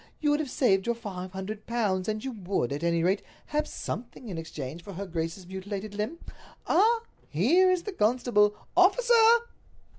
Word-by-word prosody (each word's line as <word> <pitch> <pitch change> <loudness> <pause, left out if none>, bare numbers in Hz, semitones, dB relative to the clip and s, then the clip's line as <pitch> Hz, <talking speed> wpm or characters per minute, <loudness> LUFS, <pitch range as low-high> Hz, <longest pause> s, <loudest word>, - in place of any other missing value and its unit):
You 295 -1 +2
would 295 - +2
have 305 -4 -2
saved 195 -7 +2
your 235 - +1
five 190 -5 -7
hundred 200 +3 -6
pounds, 205 -6 0
and 215 0 -2
you 265 - -2
would, 190 - -2
at 145 - -4
any 170 -1 +2
rate, 190 +3 +2 0.2
have 300 0 -1
something 235 +1 -6
in 180 - -5
exchange 160 0 -7
for 200 - -9
her 195 +3 -5
grace's 165 +1 -4
mutilated 195 +2 -6
limb. 210 +10 -3 0.5
Ah, 455 +2 +4 0.3
here 310 - +4
is 365 -2 +1
the 415 - -4
constable! 210 - +3 0.2
Officer!" 465 +4 +5
210 Hz, 175 wpm, -28 LUFS, 185-295 Hz, 0.5 s, Officer